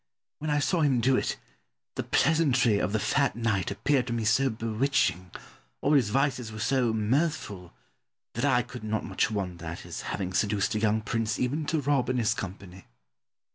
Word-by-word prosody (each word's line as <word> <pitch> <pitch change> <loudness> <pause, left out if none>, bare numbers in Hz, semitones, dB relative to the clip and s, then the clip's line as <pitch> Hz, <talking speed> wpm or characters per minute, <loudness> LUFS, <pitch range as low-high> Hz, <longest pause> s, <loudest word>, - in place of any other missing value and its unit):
When 155 - -3
I 145 - +2
saw 165 +4 +1
him 135 -5 +3
do 130 +3 +3
it - - -1 0.6
the - - -3
pleasantry 130 -8 +2
of 95 - -1
the 110 - +1
fat 140 +5 +1
knight 110 -6 0
appeared 130 +6 0
to 115 - -2
me 115 -2 -2
so 130 +5 +3
bewitching, 110 - 0 0.5
all 145 - +1
his 130 -8 +4
vices 130 -2 0
were 110 - -8
so 120 +2 +1
mirthful, 110 - -1 0.6
that 115 - -3
I 130 -4 +3
could 125 -1 -10
not 110 0 -2
much - - 0
wonder 90 -5 -4
at 85 +1 -6
his - - -7
having 95 -1 -3
seduced 100 +2 +1
a 110 - 0
young 110 0 +1
prince 110 -1 -1
even 145 +4 -1
to 160 -2 0
rob 135 -3 +1
in 125 - 0
his 110 -3 +2
company. 95 -5 -8
115 Hz, 185 wpm, -28 LUFS, 105-135 Hz, 0.6 s, his